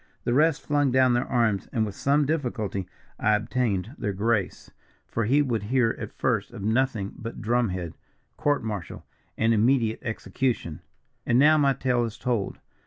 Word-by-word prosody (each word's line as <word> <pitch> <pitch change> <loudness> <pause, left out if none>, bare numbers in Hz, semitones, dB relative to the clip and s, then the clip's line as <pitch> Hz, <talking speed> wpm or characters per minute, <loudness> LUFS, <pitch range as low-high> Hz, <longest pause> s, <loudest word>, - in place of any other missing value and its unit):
The 120 - 0
rest 155 +2 +3
flung 145 -2 +2
down 130 -1 +4
their 120 +1 0
arms, 115 -5 +1
and 110 -3 +1
with 105 - -5
some 140 +7 +2
difficulty 115 - -2 0.3
I 110 - +3
obtained 105 -1 -1
their 105 -3 -2
grace, 105 0 -1 0.3
for 115 - -2
he 140 +6 +3
would 120 -6 -1
hear 115 +2 +1
at - - -6
first - - 0
of - - -7
nothing 110 -2 0
but 115 +1 -7
drum 120 0 +1
head, 90 -3 -4 0.4
court 145 -4 0
martial, 105 -6 -5 0.3
and 115 +1 +3
immediate 115 0 +2
execution. 110 - -2 0.4
"And 120 - +2
now, 155 +3 +6
my 140 -2 +4
tale 125 -2 0
is 115 0 -4
told. 120 -6 -2
120 Hz, 170 wpm, -26 LUFS, 105-130 Hz, 0.4 s, now